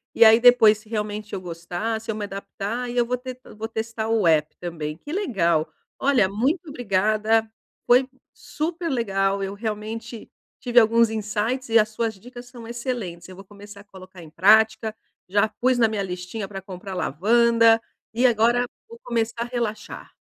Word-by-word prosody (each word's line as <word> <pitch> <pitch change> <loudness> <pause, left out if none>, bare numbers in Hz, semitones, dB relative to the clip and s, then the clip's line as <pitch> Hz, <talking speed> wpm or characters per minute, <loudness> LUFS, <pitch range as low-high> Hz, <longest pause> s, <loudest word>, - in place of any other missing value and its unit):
E 230 - +7
aí 225 +1 +7
depois, 235 -3 +6
se 215 0 -20
realmente 210 -1 -4
eu 190 - -3
gostar; 175 +6 -4
se 225 - -14
eu 220 - -1
me 210 - -4
adaptar, 200 +4 -5
aí 245 0 -5
eu 240 - +3
vou 250 +1 -1
te 255 0 -8 0.2
vou 220 +1 -5
testar 225 0 -4
o 225 -4 +1
app 155 -1 +2
também. 160 -3 -5
Que 290 - -10
legal! 175 - 0 0.3
Olha, 265 -8 +3
muito 270 - -1
obrigada. 215 -2 +1 0.4
Foi 250 +2 +4 0.3
super 330 +3 -4
legal. 195 -5 0
Eu 195 0 -4
realmente 220 +2 -6 0.3
tive 245 -1 +4
alguns 230 0 +4
insights 220 +4 -2
e 225 - +5
as 215 -1 +3
suas 220 0 -3
dicas 245 +4 -12
são 240 -2 -11
excelentes. 235 -8 -5
Eu 185 - -11
vou 195 +2 -13
começar 205 +1 -13
a - - -16
colocar 185 -3 -14
em 160 - -13
prática. 220 +4 +3 0.3
Já 205 +3 +3
pus 245 +4 0
na 235 -2 +4
minha 215 -2 -2
listinha 185 +2 -5
pra 195 -1 -7
comprar 190 0 -8
lavanda 230 - +3 0.4
e 245 +3 +2
agora 240 +1 +3 0.2
vou 465 0 -12
começar 230 0 -2
a - - -6
relaxar. 235 -3 -5
220 Hz, 180 wpm, -23 LUFS, 195-240 Hz, 0.4 s, E